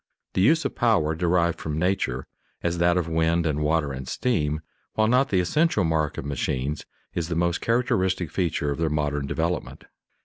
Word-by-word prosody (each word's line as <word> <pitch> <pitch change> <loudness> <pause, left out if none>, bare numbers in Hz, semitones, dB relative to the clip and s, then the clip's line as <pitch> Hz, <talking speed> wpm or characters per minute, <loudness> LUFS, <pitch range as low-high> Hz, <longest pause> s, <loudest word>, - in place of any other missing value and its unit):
The - - +1
use 155 +10 +4
of - - -1
power 100 -10 +2
derived 85 0 +1
from 75 -1 -3
nature, 80 -7 0 0.4
as 85 0 0
that 85 +1 +3
of 90 -2 0
wind 80 +1 +1
and 75 -2 0
water 75 -1 +1
and 65 -1 -6
steam, 75 -11 0 0.3
while 110 - +3
not 130 +4 +3
the 95 - +2
essential 130 - +2
mark 80 -2 0
of - - -4
machines, 70 0 -2 0.3
is 85 -2 -2
the 85 - -2
most 85 +1 +1
characteristic 95 -8 +1
feature 80 -5 0
of 70 - -4
their 80 -1 +1
modern 75 -2 -1
development. 85 +3 -2
85 Hz, 180 wpm, -25 LUFS, 75-95 Hz, 0.4 s, use